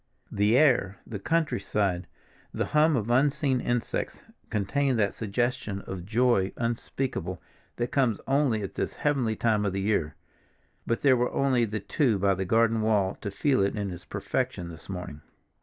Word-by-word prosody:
The 105 +4 +3
air, 120 -10 +3
the 105 - -6
countryside, 100 - 0 0.4
the - - -1
hum 155 0 +3
of 115 -1 -1
unseen 135 0 +2
insects, 120 -1 -2 0.3
contained 130 +6 0
that 100 -2 +1
suggestion 110 -2 -2
of 95 -3 -7
joy 115 -3 +2
unspeakable 120 +3 -3 0.4
that 120 0 -2
comes 125 -7 +2
only 135 -6 +1
at 95 - -5
this - - -2
heavenly 130 -7 0
time 110 -2 +1
of 100 -2 -1
the 95 - -1
year, 95 -8 0 0.7
but 115 - 0
there 135 -2 +5
were 125 0 0
only 130 -4 +2
the 110 0 -3
two 120 - +1
by 100 0 +2
the 95 0 -2
garden 115 +2 +3
wall 105 -3 +2
to 100 - -3
feel 130 +4 +1
it 100 +2 +1
in 100 -3 -3
its 90 0 -8
perfection 85 -1 -3
this 80 +1 -12
morning. 90 -5 -6
110 Hz, 165 wpm, -27 LUFS, 100-130 Hz, 0.7 s, there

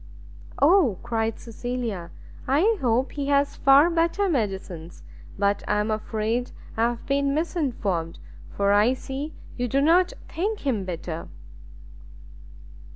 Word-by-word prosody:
"O," 300 - +5
cried 225 -2 -1
Cecilia, 230 -6 -4 0.4
"I 355 - +3
hope 250 +1 +1
he 285 -1 -4
has 280 0 +2
far 275 +3 +6
better 340 +4 +1
medicines: 190 - -3 0.3
but 200 0 +1
I 210 - +2
am 210 +1 0
afraid 220 +3 -1 0.3
I 230 +1 +2
have 240 -1 -6
been 280 0 +1
misinformed, 235 - -1 0.3
for 200 0 +1
I 210 +5 +4
see 275 +4 -6 0.2
you 245 0 -1
do 270 +4 +1
not 345 +5 +4 0.2
think 405 +6 -2
him 230 -9 -1
better." 170 -2 -5
245 Hz, 125 wpm, -25 LUFS, 210-285 Hz, 0.4 s, far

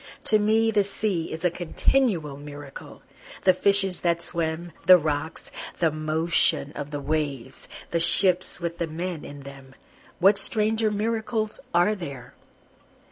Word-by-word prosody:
To 215 - +3
me 220 +2 +2
the 210 -2 +2
sea 195 -4 -3
is 160 +2 -5
a 175 - +3
continual 175 - 0
miracle, 145 -1 -11 0.4
The 185 - +5
fishes 195 0 +2
that 170 -1 +1
swim 170 0 -3 0.2
the 185 - +9
rocks 155 -1 -4 0.3
the 165 -2 +1
motion 155 -1 +1
of 145 -1 -7
the 145 -1 -5
waves 145 -4 -4 0.2
the 170 - 0
ships 185 +2 +3
with 170 -1 -5
the 170 - -1
men 170 +1 -5
in 145 0 -10
them, 135 -1 -13 0.4
What 195 +2 +5
stranger 220 0 +2
miracles 220 +1 -2
are 175 +5 +3
there? 140 -10 -8
170 Hz, 140 wpm, -25 LUFS, 150-200 Hz, 0.4 s, the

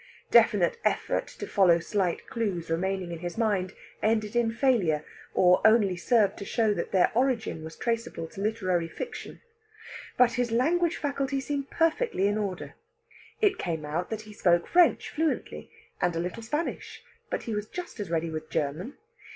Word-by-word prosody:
Definite 210 -6 +4
effort - - 0
to - - -8
follow 185 -5 +4
slight 180 +1 -1
clues 190 -8 -3
remaining 185 +1 -1
in 170 - -5
his 175 +3 -5
mind 200 -5 0 0.3
ended 215 0 +1
in 235 -1 +2
failure, 225 - +1 0.3
or 180 0 +5
only 215 -4 +5
served 210 +3 +2
to - - -5
show 220 -1 +1
that - - -4
their 185 -2 +4
origin 230 -8 0
was 160 0 -8
traceable 230 -7 -2
to 195 - -8
literary 185 -6 0
fiction. 470 - -7 0.8
But 250 -1 +5
his 245 -1 -1
language 330 +8 +2
faculty 280 -1 -1
seemed 280 0 -3
perfectly 330 - +1
in 205 +1 +1
order. 195 -4 -4 0.7
It 405 -3 +3
came 160 -4 -3
out 165 +4 -3
that 220 -1 -4
he 215 0 -12
spoke 175 -4 +2
French 350 -2 +4
fluently, 315 +1 -2 0.3
and 175 -1 +1
a - - -1
little 180 +6 -4
Spanish, 295 +9 -4 0.3
but - - -3
he 230 - -4
was 210 0 -3
just 355 -5 -7
as 200 -4 -4
ready 165 0 -1
with 155 0 -6
German. 155 - -3
210 Hz, 165 wpm, -28 LUFS, 175-240 Hz, 0.8 s, or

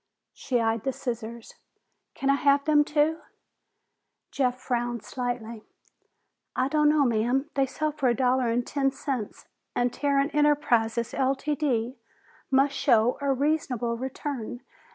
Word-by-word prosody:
She 250 -2 -1
eyed 225 -1 0
the 270 - -1
scissors. 235 -3 -6 0.6
"Can 275 0 +1
I - - +4
have 280 0 +3
them, 300 -1 +5
too?" 305 +2 +1 1.1
Jeff 255 -2 0
frowned 240 -3 -2
slightly. 235 -1 -4 0.9
"I 255 +1 +1
don't 300 0 +3
know, 300 -2 +4
ma'am. 245 +5 0
They 270 -1 +1
sell 305 +3 -2
for 280 -4 0
a 240 - +2
dollar 255 0 +2
and 235 +1 0
ten 275 -2 +1
cents, 265 -5 -5 0.3
and 245 0 +1
Tarrant 280 0 +1
Enterprises, 240 -6 +2
Ltd., 270 -3 0 0.5
must 275 +1 +3
show 245 -3 +3
a 280 -1 +1
reasonable 265 -4 0
return. 260 -1 -5
260 Hz, 135 wpm, -26 LUFS, 240-285 Hz, 1.1 s, them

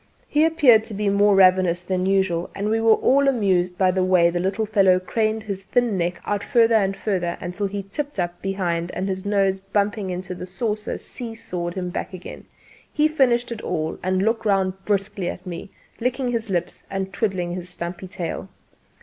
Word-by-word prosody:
He 305 +1 +3
appeared 285 -9 +5
to 215 - -7
be 205 0 0
more 200 0 +4
ravenous 185 -2 +4
than 185 0 -1
usual, 190 -3 +1
and 200 +1 -2
we 225 +1 +1
were 225 -1 +6
all 275 +1 +3
amused 185 -8 +1
by 185 -1 +3
the 185 0 +1
way 180 -2 +4
the 175 - -1
little 195 +4 0
fellow 195 -3 +4
craned 215 +3 -1
his 200 -3 -5
thin 240 +2 +1
neck 175 -1 -1
out 205 -1 -1
further 230 -3 +3
and 195 -3 +2
further 180 -5 -1
until 190 +3 -3
he 200 0 -4
tipped 280 +6 -5
up 175 0 -2
behind 175 -3 -1
and 190 - -2
his 190 +1 -3
nose 195 -2 +2
bumping 200 +1 -1
into 180 0 -4
the 180 0 -7
saucer 210 +2 -3
see 230 -2 -7
sawed 180 -6 -5
him 180 -2 -3
back 185 - -4
again. 180 - -10 0.5
He 305 0 +3
finished 245 -6 +2
it 225 -2 -5
all 155 0 -3
and 185 +1 0
looked 225 +1 +1
round 195 -3 +2
briskly 200 -2 -1
at 180 - -7
me, 180 +1 -6 0.3
licking 250 +1 -1
his 230 -2 -2
lips 175 -2 -3
and 190 0 -3
twiddling 185 -5 -1
his 180 0 -5
stumpy 175 +1 -6
tail. 185 0 -5
195 Hz, 195 wpm, -23 LUFS, 180-220 Hz, 0.5 s, were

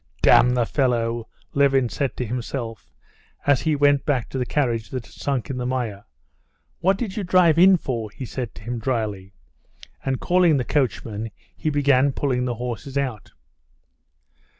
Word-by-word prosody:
"Damn 125 +1 +6
the 120 -2 +2
fellow!" 120 -3 0 0.3
Levin 135 -2 +3
said 135 +3 -3
to 125 - -2
himself, 120 -1 -5 0.5
as 140 -3 +3
he 155 -1 +1
went 145 -1 +3
back 130 -6 -1
to 135 - -4
the 125 - -2
carriage 120 -6 0
that 125 -3 -5
had - - -17
sunk 140 -1 -2
in 130 - -4
the 125 - -3
mire. 120 -6 -3 0.7
"What 190 +3 +2
did 210 -5 -4
you 210 - -1
drive 175 -3 +4
in 185 +1 +7
for?" 115 -8 -4
he 130 +6 -8
said 120 -3 -5
to 95 - -12
him 120 +2 -4
dryly, 105 -6 -3 0.7
and 135 -1 -1
calling 175 -4 +3
the 125 - -1
coachman, 115 -6 -1 0.3
he 155 - -2
began 140 -2 +3
pulling 125 -3 0
the 120 -1 -2
horses 125 +3 -5
out. 130 -7 -3
130 Hz, 170 wpm, -23 LUFS, 115-145 Hz, 0.7 s, in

